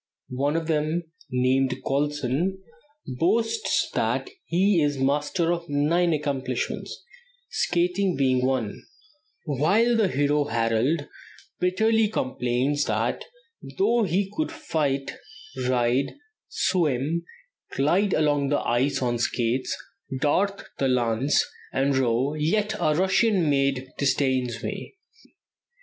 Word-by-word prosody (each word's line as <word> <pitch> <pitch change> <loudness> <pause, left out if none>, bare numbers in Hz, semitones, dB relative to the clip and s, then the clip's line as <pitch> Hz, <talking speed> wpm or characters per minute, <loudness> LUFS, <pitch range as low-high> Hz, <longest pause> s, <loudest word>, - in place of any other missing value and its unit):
One 140 +4 -1
of 165 -1 -1
them, 155 +2 0 0.3
named 130 0 +2
Kolson, 145 +5 0 0.5
boasts 210 - +1
that - - -1
he 185 0 +2
is 145 -1 +1
master 145 +6 +1
of 170 -1 -5
nine 165 +5 +2
accomplishments, 140 -5 -3 0.5
skating 180 +2 +1
being 130 -2 +2
one; 130 -5 -1 0.6
while 185 - +2
the 220 -3 +3
hero 145 -1 +1
Harold 115 +5 0 0.5
bitterly 220 +4 +2
complains 130 - -1
that - - -1 0.5
though 240 -12 +3
he 195 0 0
could 315 +1 -1
fight, 150 - -2 0.5
ride, 125 +1 +1 0.3
swim, 160 -1 0 0.5
glide 180 +8 +2
along 145 -2 +2
the 145 - +1
ice 130 +3 0
on 120 -1 0
skates, 120 +2 -1 0.4
dart 195 +8 +1 0.2
the 135 - +2
lance, 125 +2 +2 0.3
and 135 +1 +1
row, 130 +2 +1
"yet 205 +8 0
a 150 - +2
Russian 190 -1 +2
maid 135 -2 +1
disdains 130 -4 0
me." 200 - -5
145 Hz, 105 wpm, -25 LUFS, 130-175 Hz, 0.6 s, the